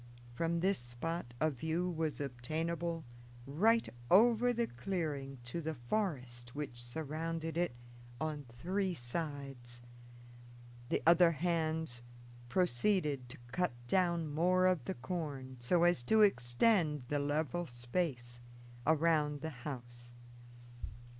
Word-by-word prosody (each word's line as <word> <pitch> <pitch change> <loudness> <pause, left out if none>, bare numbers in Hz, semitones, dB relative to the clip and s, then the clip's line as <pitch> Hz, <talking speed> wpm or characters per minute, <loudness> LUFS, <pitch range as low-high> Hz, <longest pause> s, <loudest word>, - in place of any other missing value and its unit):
From 165 +5 0
this 195 +1 +2
spot 120 +2 -4
a 155 0 +3
view 160 +7 -1
was 160 -3 -2
obtainable 160 +5 -2 0.4
right 215 - +3 0.2
over 235 +5 +6
the 235 -1 +1
clearing 140 - -3
to 120 +8 -4
the 160 0 -3
forest 125 - -3
which 130 -5 -4
surrounded 160 +4 -3
it 170 -7 0 0.4
on 155 -2 -3
three 180 +10 -1
sides. 135 -3 -4 1.1
The - - 0
other 170 0 +7
hands 160 -5 -1 0.5
proceeded 150 - +1
to - - -10
cut 180 0 0
down 170 +1 +2
more 180 +5 +3
of 180 -8 +2
the - - -2
corn, 135 -2 -4
so 165 +8 +3
as 175 -7 +4
to 220 - +6
extend 150 - +3
the 145 +4 -1
level 150 +4 -1
space 120 -1 -3 0.5
around 155 -2 +3
the 160 - -3 0.2
house. 120 -2 -9
155 Hz, 115 wpm, -35 LUFS, 125-175 Hz, 1.1 s, other